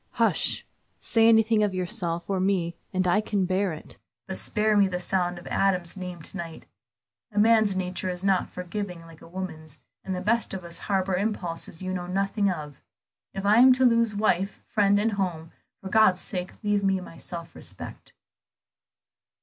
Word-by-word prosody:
"Hush! - - +1 0.3
Say 225 -1 +3
anything 225 -1 +4
of 205 -3 +1
yourself 180 -3 -2
or 195 -1 0
me, 185 -3 0 0.2
and 185 0 0
I 210 +4 +3
can 205 -3 0
bear 190 +1 0
it, 155 - -10 0.3
but - - -4
spare 215 -1 +1
me 200 -1 +5
the 180 -1 -3
sound 180 -1 -1
of 175 - -11
Adam's 180 -3 +1
name 180 -3 -7
to 190 - -7
night. 165 -2 -7 0.7
A 210 - -10
man's 220 -2 +4
nature 185 0 -2
is 180 0 -5
not 195 -2 +2
forgiving 180 -1 -5
like 165 -1 -15
a - - -13
woman's, 160 -4 -7 0.3
and 190 - -3
the - - -3
best 220 +2 0
of 185 - -6
us 170 0 -3
harbor 190 -1 +1
impulses 180 -4 -2
you 185 0 -3
know 175 -1 -4
nothing 195 +2 0
of. 150 -6 -6 0.5
If 195 +1 -4
I 210 +3 +5
am 255 +1 +8
to 255 +1 +3
lose 230 -3 +3
wife, 195 -2 0
friend, 205 -1 +3
and 220 +2 +2
home, 175 -5 -3 0.3
for 190 - -6
God's 190 -3 +4
sake 180 -2 -3
leave 205 -1 +1
me 195 -1 +2
my 175 -2 -11
self 170 -1 -7
respect." - - -10
190 Hz, 180 wpm, -26 LUFS, 175-205 Hz, 0.7 s, am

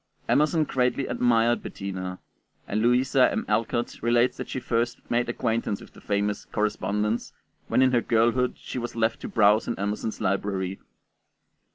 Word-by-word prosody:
Emerson 155 +2 +3
greatly 130 -1 0
admired 120 -1 +2
Bettina, 95 -2 -5 0.5
and 105 +2 -1
Louisa 125 +2 +4
M. - - -2
Alcott 115 +2 -1
relates 120 +1 +3
that - - -6
she - - -3
first 120 0 -1
made 120 0 +1
acquaintance 115 -3 -1
with - - -14
the - - -15
famous 100 0 -1
'Correspondence' 105 +1 -1 0.3
when 130 - +3
in 130 - +4
her 120 -2 +3
girlhood 120 +3 +2
she - - -6
was 120 -1 -5
left 115 0 0
to - - -5
browse 105 0 +3
in 120 - -2
Emerson's 105 +2 -3
library. 95 -1 -1
115 Hz, 155 wpm, -26 LUFS, 105-120 Hz, 0.5 s, Louisa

